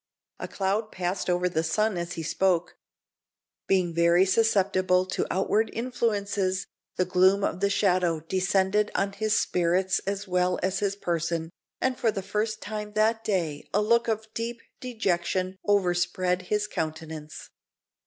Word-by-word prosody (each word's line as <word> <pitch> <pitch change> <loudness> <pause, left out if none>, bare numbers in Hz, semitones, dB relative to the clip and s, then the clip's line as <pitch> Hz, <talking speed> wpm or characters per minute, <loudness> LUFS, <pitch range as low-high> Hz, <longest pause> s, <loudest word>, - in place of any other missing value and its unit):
A - - -4
cloud 205 +3 -1
passed 180 +1 -2
over 180 0 +2
the 170 -3 0
sun 215 +5 0
as 170 0 -3
he 165 -2 -5
spoke. 175 +2 0 0.9
Being 185 -3 +2
very 170 +2 +4
susceptible 190 -3 +2
to 185 - -2
outward 210 +3 +1
influences, 205 -6 -1 0.3
the 185 - +1
gloom 185 +2 +3
of 180 - -1
the 200 +1 +2
shadow 180 -5 +2
descended 190 +4 +1
on 200 0 +1
his 215 +2 0
spirits 180 +2 +1
as 200 +1 -2
well 180 0 +1
as 190 +1 0
his 200 -1 0
person, 170 -3 -2 0.3
and 260 -1 0
for 230 - +2
the 200 -3 -3
first 215 +2 -2
time 210 0 -5
that 220 +1 +2
day 170 -9 -2
a 210 - +4
look 235 +2 +3
of 220 -1 -1
deep 230 0 -4 0.2
dejection 185 -5 -1
overspread 180 -2 +1
his 210 0 0
countenance. 160 -4 -6
190 Hz, 145 wpm, -27 LUFS, 180-210 Hz, 0.9 s, very